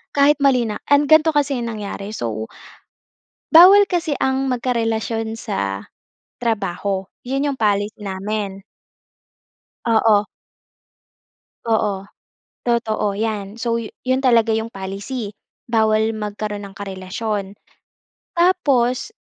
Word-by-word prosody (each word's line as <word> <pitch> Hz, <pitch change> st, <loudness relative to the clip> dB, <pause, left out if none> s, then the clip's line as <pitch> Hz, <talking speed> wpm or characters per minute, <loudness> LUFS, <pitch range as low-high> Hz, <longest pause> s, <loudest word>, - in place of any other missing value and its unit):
kahit 290 Hz, +1 st, +4 dB
mali 260 Hz, -4 st, +4 dB
na. 210 Hz, -, -4 dB
An 285 Hz, 0 st, +5 dB
gan'to 315 Hz, +2 st, +6 dB
kasi 285 Hz, -3 st, +1 dB
yung 235 Hz, -, -3 dB
nangyari 200 Hz, -1 st, -6 dB
so 110 Hz, -, -4 dB, 1.0 s
bawal 385 Hz, +5 st, +8 dB
kasi 335 Hz, -4 st, 0 dB
ang 265 Hz, 0 st, +1 dB
magkarelasyon 225 Hz, -3 st, -1 dB
sa 100 Hz, -, -4 dB, 0.5 s
trabaho, 200 Hz, -4 st, -2 dB, 0.2 s
'yun 275 Hz, +3 st, -1 dB
'yung 280 Hz, -, -2 dB
policy 205 Hz, -2 st, 0 dB
namin. 200 Hz, 0 st, -4 dB, 1.3 s
Oo. 220 Hz, -2 st, +4 dB, 1.4 s
Oo 205 Hz, -3 st, 0 dB, 0.6 s
totoo, 225 Hz, -4 st, 0 dB
'yan, 210 Hz, -1 st, -3 dB
so, 230 Hz, -1 st, 0 dB
yu 225 Hz, -, -7 dB
'yon 260 Hz, 0 st, +1 dB
talaga 235 Hz, -3 st, +4 dB
'yong 220 Hz, 0 st, 0 dB
policy. 200 Hz, +4 st, -5 dB, 0.4 s
Bawal 220 Hz, -1 st, +3 dB
magkaroon 210 Hz, -1 st, -4 dB
ng 195 Hz, -, -15 dB
karelasyon. 195 Hz, +1 st, -4 dB, 0.9 s
Tapos, 280 Hz, -, +2 dB
220 Hz, 105 wpm, -20 LUFS, 205-255 Hz, 1.4 s, bawal